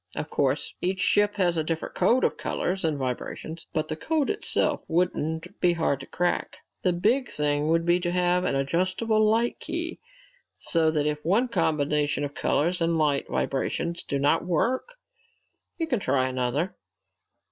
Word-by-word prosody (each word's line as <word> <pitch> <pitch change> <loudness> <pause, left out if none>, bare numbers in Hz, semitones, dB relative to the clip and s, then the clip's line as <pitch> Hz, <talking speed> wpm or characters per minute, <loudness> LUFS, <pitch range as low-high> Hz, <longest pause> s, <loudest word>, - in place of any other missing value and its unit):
Of 150 - -4
course 140 0 0
each 185 +1 0
ship 205 +2 +2
has 175 -4 +2
a 160 - +1
different 160 +1 -3
code 255 +2 +3
of - - +2
colors 190 +1 -2
and 155 -3 0
vibrations, 135 +5 -5
but 155 -1 -1
the 155 - -3
code 305 - 0
itself 420 - 0
wouldn't 165 -1 -1
be 175 -1 +3
hard 160 -5 0
to 135 - -9
crack. 175 0 -1 0.2
The 185 - +2
big 225 +9 +1
thing 145 0 0
would 165 +1 +2
be 175 +1 +3
to 175 -1 -2
have 180 0 +2
an 140 - 0
adjustable 185 +10 +1
light 225 +3 +2
key, - - -2 0.6
so 165 -2 +1
that 150 -2 0
if 150 0 -1
one 220 +9 +2
combination 150 -6 +1
of 145 0 -4
colors 175 +6 +1
and 165 0 +2
light 145 -3 +1
vibrations 170 +5 -1
do 140 - -3
not 145 +4 +2
work, 245 - -1 0.8
you 330 - -1
can 255 -8 0
try 130 -8 +1
another. 130 +7 -1
165 Hz, 170 wpm, -26 LUFS, 150-185 Hz, 0.8 s, code